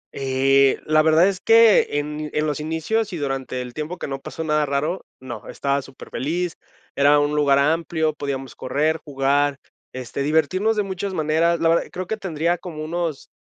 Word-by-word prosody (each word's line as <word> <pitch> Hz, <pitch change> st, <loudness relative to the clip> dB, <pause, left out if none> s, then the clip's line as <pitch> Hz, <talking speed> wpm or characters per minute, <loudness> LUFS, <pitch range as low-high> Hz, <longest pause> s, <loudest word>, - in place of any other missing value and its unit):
Eh, 135 Hz, 0 st, +3 dB
la 155 Hz, 0 st, +4 dB
verdad 160 Hz, +3 st, +5 dB
es 195 Hz, -2 st, -1 dB
que 225 Hz, -9 st, +5 dB
en 150 Hz, +1 st, -3 dB
en 150 Hz, -, 0 dB
los 150 Hz, -1 st, -2 dB
inicios 165 Hz, +8 st, -1 dB
y 175 Hz, -, -3 dB
durante 135 Hz, -3 st, -3 dB
el 125 Hz, -1 st, -10 dB
tiempo 155 Hz, +4 st, -5 dB
que -, -, -5 dB
no 135 Hz, -1 st, -4 dB
pasó 160 Hz, -, -6 dB
nada 150 Hz, -1 st, +1 dB
raro, 150 Hz, +6 st, -2 dB
no. 130 Hz, -2 st, -8 dB
Estaba 140 Hz, 0 st, -1 dB
superfeliz, 160 Hz, +6 st, -4 dB, 0.4 s
era 145 Hz, +1 st, +5 dB
un 145 Hz, 0 st, +1 dB
lugar 140 Hz, -2 st, +3 dB
amplio, 160 Hz, +2 st, +1 dB
podíamos 140 Hz, -3 st, -5 dB
correr, 155 Hz, +5 st, 0 dB
jugar, 140 Hz, 0 st, +1 dB, 0.3 s
este, 130 Hz, +1 st, -5 dB
divertirnos 160 Hz, +9 st, +1 dB
de 210 Hz, -, +1 dB
muchas 190 Hz, 0 st, -4 dB
maneras, 160 Hz, +2 st, +1 dB
la 165 Hz, -, +3 dB
verdad, 165 Hz, -, +3 dB
creo 185 Hz, 0 st, -5 dB
que 220 Hz, +3 st, -3 dB
tendría 175 Hz, -2 st, -1 dB
como 160 Hz, -4 st, -7 dB
unos 165 Hz, -2 st, -3 dB
155 Hz, 180 wpm, -22 LUFS, 140-170 Hz, 0.4 s, verdad